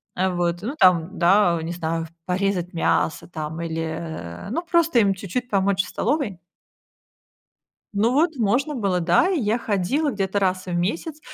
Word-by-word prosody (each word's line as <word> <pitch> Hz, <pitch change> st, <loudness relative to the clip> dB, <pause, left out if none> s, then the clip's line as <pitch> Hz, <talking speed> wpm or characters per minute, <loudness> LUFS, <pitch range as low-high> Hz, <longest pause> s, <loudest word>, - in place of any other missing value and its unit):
а, 190 Hz, +1 st, +1 dB
вот, 175 Hz, -1 st, -1 dB
ну, 240 Hz, +9 st, -4 dB
там, 180 Hz, 0 st, +4 dB
да, 175 Hz, -1 st, +4 dB
не 165 Hz, +2 st, -4 dB
знаю, 165 Hz, -1 st, -2 dB
в -, -, -13 dB, 0.2 s
порезать 185 Hz, -1 st, -1 dB
мясо 165 Hz, -1 st, 0 dB
там 160 Hz, -1 st, -5 dB
или, 165 Hz, -1 st, -3 dB
э, 160 Hz, -, -6 dB
ну, 315 Hz, +10 st, -1 dB
просто 335 Hz, -6 st, +3 dB
им 200 Hz, -3 st, +3 dB
чуть-чуть 200 Hz, +6 st, -4 dB
помочь 195 Hz, -2 st, +2 dB
в -, -, -10 dB
столовой. 260 Hz, -, -1 dB, 1.5 s
Ну, 215 Hz, +4 st, +2 dB
вот, 315 Hz, +3 st, +2 dB
можно 250 Hz, +6 st, +1 dB
было, 195 Hz, -6 st, 0 dB
да, 175 Hz, -, +3 dB
и 360 Hz, -6 st, +1 dB
я 220 Hz, +1 st, +1 dB
ходила 235 Hz, -, 0 dB
где-то 195 Hz, -1 st, -1 dB
раз 185 Hz, -1 st, 0 dB
в 180 Hz, -, -4 dB
месяц, 225 Hz, -, -2 dB
190 Hz, 170 wpm, -23 LUFS, 170-230 Hz, 1.5 s, там